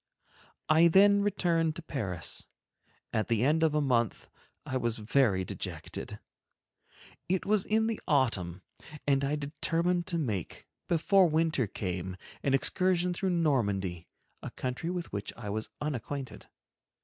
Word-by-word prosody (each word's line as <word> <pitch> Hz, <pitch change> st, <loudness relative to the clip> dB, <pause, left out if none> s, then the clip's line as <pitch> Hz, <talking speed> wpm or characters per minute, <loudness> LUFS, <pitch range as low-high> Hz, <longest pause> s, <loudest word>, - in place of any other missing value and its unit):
I 160 Hz, +2 st, +6 dB
then 200 Hz, +4 st, +6 dB
returned 170 Hz, -5 st, +1 dB
to 170 Hz, -, -7 dB
Paris. 100 Hz, -, -2 dB, 0.7 s
At 110 Hz, -1 st, 0 dB
the 115 Hz, -1 st, +1 dB
end 155 Hz, +4 st, +3 dB
of 160 Hz, -2 st, +3 dB
a 150 Hz, -, +3 dB
month 120 Hz, -6 st, 0 dB, 0.4 s
I 130 Hz, -, -4 dB
was 120 Hz, -3 st, 0 dB
very 110 Hz, -4 st, +2 dB
dejected. -, -, -5 dB, 1.1 s
It 185 Hz, 0 st, 0 dB
was 210 Hz, -1 st, +2 dB
in 220 Hz, +1 st, +2 dB
the 225 Hz, -1 st, -2 dB
autumn, 100 Hz, -, +1 dB, 0.4 s
and 140 Hz, -1 st, +2 dB
I 140 Hz, +2 st, +1 dB
determined 165 Hz, +4 st, -1 dB
to 175 Hz, -2 st, 0 dB
make, 110 Hz, -, -3 dB, 0.2 s
before 180 Hz, +3 st, +4 dB
winter 155 Hz, -6 st, +1 dB
came, 95 Hz, -1 st, -4 dB, 0.2 s
an 135 Hz, -1 st, +2 dB
excursion 180 Hz, +5 st, +2 dB
through 190 Hz, +2 st, -1 dB
Normandy, 100 Hz, -, 0 dB, 0.3 s
a -, -, -5 dB
country 130 Hz, +6 st, -4 dB
with 175 Hz, -1 st, -4 dB
which 100 Hz, 0 st, -4 dB
I 105 Hz, -4 st, -5 dB
was 110 Hz, +1 st, -3 dB
unacquainted. 140 Hz, -2 st, -5 dB
145 Hz, 135 wpm, -30 LUFS, 110-170 Hz, 1.1 s, I